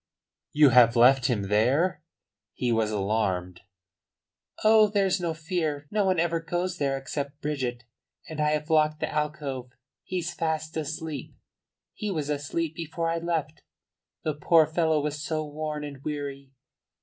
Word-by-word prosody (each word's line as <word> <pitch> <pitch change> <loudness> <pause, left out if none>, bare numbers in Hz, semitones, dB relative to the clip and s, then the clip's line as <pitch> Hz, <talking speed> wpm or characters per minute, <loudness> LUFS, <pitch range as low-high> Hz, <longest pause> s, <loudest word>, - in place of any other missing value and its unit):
"You 150 -1 +6
have 120 -1 +6
left 125 +1 +6
him 115 -5 0
there?" 130 - +2 0.5
He 125 -1 0
was 110 -2 +2
alarmed. 95 -4 -1 1.0
"Oh, 215 0 +6
there's 195 -2 +1
no 165 -2 -1
fear. 160 -3 -2
No 210 -1 +2
one 185 -3 +2
ever 165 0 +1
goes 175 +2 -3
there 135 -1 0
except 140 +1 -5
Bridget. 130 -5 -3 0.4
And 155 -1 -4
I 150 - +3
have 150 +1 -2
locked 155 -1 +3
the - - -2
alcove. 145 -4 -3 0.3
He's 180 -2 -3
fast 160 -1 -2
asleep. 155 -2 -5 0.6
He 210 - -4
was 150 -6 -2
asleep 150 +3 -2
before 165 0 -3
I 165 - -1
left. 160 -2 -2 0.6
The 155 - 0
poor 160 +2 +4
fellow 160 0 +1
was 150 0 -3
so 155 0 -2
worn 150 0 -4
and 140 -2 -8
weary." 140 -2 -5
150 Hz, 150 wpm, -27 LUFS, 135-165 Hz, 1.0 s, You